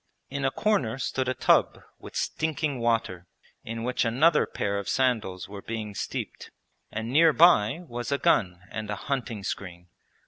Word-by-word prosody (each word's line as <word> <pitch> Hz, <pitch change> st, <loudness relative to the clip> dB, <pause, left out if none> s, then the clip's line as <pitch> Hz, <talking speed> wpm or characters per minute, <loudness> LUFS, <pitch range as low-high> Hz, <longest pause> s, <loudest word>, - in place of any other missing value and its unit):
In 140 Hz, 0 st, -2 dB
a -, -, +4 dB
corner 135 Hz, -, 0 dB
stood 130 Hz, -1 st, -2 dB
a 130 Hz, -, -1 dB
tub -, -, +3 dB, 0.2 s
with -, -, -11 dB
stinking 155 Hz, -3 st, -1 dB
water, 110 Hz, -7 st, 0 dB, 0.4 s
in 115 Hz, 0 st, -5 dB
which 125 Hz, +1 st, 0 dB
another 145 Hz, +8 st, +3 dB
pair 100 Hz, 0 st, -2 dB
of 100 Hz, -, -5 dB
sandals 110 Hz, -9 st, 0 dB
were 100 Hz, 0 st, -8 dB
being 110 Hz, -2 st, -5 dB
steeped, -, -, -5 dB, 0.4 s
and 110 Hz, +2 st, -4 dB
near 160 Hz, +2 st, +6 dB
by 165 Hz, -3 st, +5 dB
was 120 Hz, +1 st, -5 dB
a 140 Hz, -, +2 dB
gun 90 Hz, -9 st, +2 dB
and 110 Hz, -1 st, -5 dB
a 105 Hz, -, -1 dB
hunting 120 Hz, -3 st, -3 dB
screen. 90 Hz, -2 st, -6 dB
115 Hz, 165 wpm, -27 LUFS, 105-135 Hz, 0.4 s, near